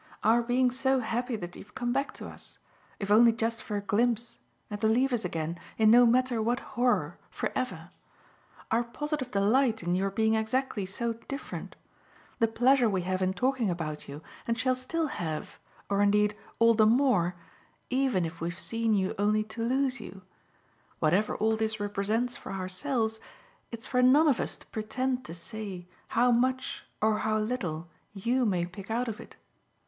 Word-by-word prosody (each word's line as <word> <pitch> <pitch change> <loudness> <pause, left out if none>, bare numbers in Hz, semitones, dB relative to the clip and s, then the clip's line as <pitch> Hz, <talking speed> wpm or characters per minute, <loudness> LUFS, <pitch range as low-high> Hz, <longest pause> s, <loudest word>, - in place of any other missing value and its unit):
Our 230 +3 +5
being 250 +1 +2
so 265 +1 +1
happy 240 +2 -2
that 175 -4 -7
you've 210 - -13
come 240 -1 -1
back 275 +1 0
to - - -8
us - - -11 0.4
if 200 0 -3
only 230 +2 +7
just 230 0 -2
for 210 - -3
a - - -2
glimpse 230 - 0 0.3
and 205 -1 -6
to 220 - +3
leave 250 +4 +2
us 230 -3 0
again, 165 -1 -3 0.2
in 220 -1 +5
no 240 +1 +8
matter 245 -1 +2
what 240 +3 +1
horror, 245 0 +1
for - - -3
ever; 185 -10 -4 0.8
our 230 +2 +3
positive 290 +2 -4
delight 220 +2 +2
in 175 +1 0
your 190 +2 +1
being 220 +2 +1
exactly 220 -2 -1
so 230 +4 -2
different; 275 +5 -7 0.6
the 230 - +4
pleasure 245 +2 +4
we 190 -3 -1
have 185 +1 -1
in 185 0 +2
talking 255 -1 +1
about 155 -4 -4
you, 145 +3 -8 0.2
and 230 0 0
shall 255 +3 +2
still 270 +6 -2
have 165 - -4 0.3
or 200 0 +1
indeed 210 +1 +3 0.2
all 230 0 +6
the 215 -1 +5
more 220 -8 +3 0.6
even 255 -9 +2
if 165 +1 -7
we've 170 +1 -3
seen 225 -1 +1
you 190 -1 0
only 210 +1 +2
to 220 +2 -6
lose 260 +1 +1
you: 195 -3 -10 0.7
whatever 180 +7 +2
all 220 +1 +2
this 220 0 -1
represents 205 +4 -1
for - - -8
ourselves 220 +5 -2 0.5
it's 230 -1 -7
for 250 -1 +1
none 280 +6 +6
of 275 -5 +3
us - - -2
to - - -17
pretend 255 +4 -2
to 165 - -7
say 190 -1 -7 0.2
how 245 +2 +3
much 255 +2 0 0.2
or 215 -1 +3
how 215 0 +1
little 200 -8 -2 0.3
YOU 240 +5 +1
may 180 -4 +1
pick 190 +3 -10
out 240 +3 0
of 225 -1 -4
it. - - -12
225 Hz, 180 wpm, -29 LUFS, 200-250 Hz, 0.8 s, no